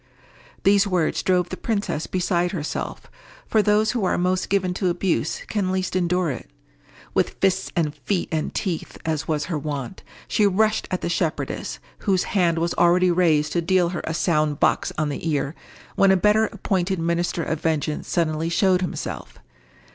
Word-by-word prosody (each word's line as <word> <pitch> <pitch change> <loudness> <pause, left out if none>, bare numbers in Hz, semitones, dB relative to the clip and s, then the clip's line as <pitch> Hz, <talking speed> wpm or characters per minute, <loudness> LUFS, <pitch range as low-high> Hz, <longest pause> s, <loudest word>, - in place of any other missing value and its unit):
These 200 +1 +4
words 180 -5 +1
drove 180 -1 +1
the - - -4
princess 200 -8 -2
beside 180 -1 0
herself; 155 -4 -4 0.4
for 220 - +3
those 210 +1 +3
who 240 -5 -1
are 185 - +1
most 180 +1 0
given 185 -2 +1
to 185 0 0
abuse 175 +1 -1
can 195 -4 -1
least 185 -1 -2
endure 180 -2 +1
it. 125 - -7 0.6
With - - 0
fists 190 -1 +1
and 155 -4 +1
feet 155 +6 -2
and 155 -1 -1
teeth, 175 -5 -3
as 160 -1 -1
was 150 -2 0
her 165 -4 -2
wont, 145 +3 -5 0.3
she 210 - +3
rushed 215 +3 +1
at 185 - -2
the - - -2
shepherdess, 170 -2 -2 0.2
whose 190 -3 +1
hand 175 -4 +3
was 170 +1 0
already 180 +1 +4
raised 155 -4 +2
to 170 - +1
deal 180 0 +2
her 175 - -4
a 160 - -2
sound 155 -4 +1
box - - +2
on 155 -1 0
the 145 +3 -3
ear, 145 -1 -1 0.4
when 195 - +5
a 190 - +5
better 210 +3 +4
appointed 190 -1 -1
minister 170 0 -1
of 160 0 -3
vengeance 155 -2 -1
suddenly 165 -1 0
showed 185 +1 +3
himself. 180 - -5
175 Hz, 175 wpm, -23 LUFS, 160-190 Hz, 0.6 s, when